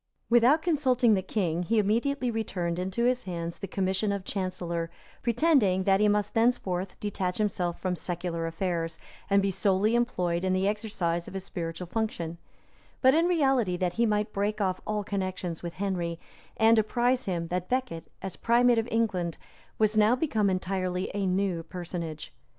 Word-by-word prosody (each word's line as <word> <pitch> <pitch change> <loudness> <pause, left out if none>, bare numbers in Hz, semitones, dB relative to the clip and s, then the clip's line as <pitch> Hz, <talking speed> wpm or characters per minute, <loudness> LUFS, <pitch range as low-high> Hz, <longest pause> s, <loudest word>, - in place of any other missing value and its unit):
Without 245 +7 +5
consulting 260 -8 +3
the 190 - +2
king, 180 -4 -1
he 225 +6 0
immediately 240 +5 +1
returned 180 -6 -2
into 190 +6 -1
his 250 0 +1
hands 170 -2 -4
the 195 - -5
commission 190 +2 0
of 200 -1 -2
chancellor; 175 -3 -3 0.3
pretending 235 - +3
that 195 0 +3
he 210 - +4
must 205 0 +1
thenceforth 200 -6 0
detach 185 -3 -2
himself 185 -5 -1
from 185 -1 -1
secular 170 -1 -3
affairs, 165 -1 -2 0.3
and 200 0 +4
be 195 - +1
solely 195 +3 +2
employed 180 -8 0
in 185 0 +1
the 190 +1 +1
exercise 195 -5 -1
of - - -9
his 190 - -4
spiritual 170 -1 -5
function; 170 -4 -3 0.6
but 260 +1 +7
in 330 +3 +3
reality, 270 - +2
that 180 -1 -1
he 235 +3 +2
might 210 0 0
break 205 +2 -1
off 185 -2 0
all 210 -1 -1
connections 185 -4 -3
with 170 -1 -5
Henry, 175 -4 -2 0.4
and 225 0 +5
apprise 245 +3 +1
him 170 -3 -2
that 180 0 -2
Becket, 250 -11 -2 0.2
as 190 -2 -4
primate 240 0 +4
of 225 - -2
England, 190 -8 0 0.4
was 215 0 +2
now 215 +3 +5
become 225 -8 +1
entirely 185 0 -1
a 200 -1 -1
new 185 -2 0
personage. 170 -3 -6
195 Hz, 165 wpm, -28 LUFS, 180-225 Hz, 0.6 s, but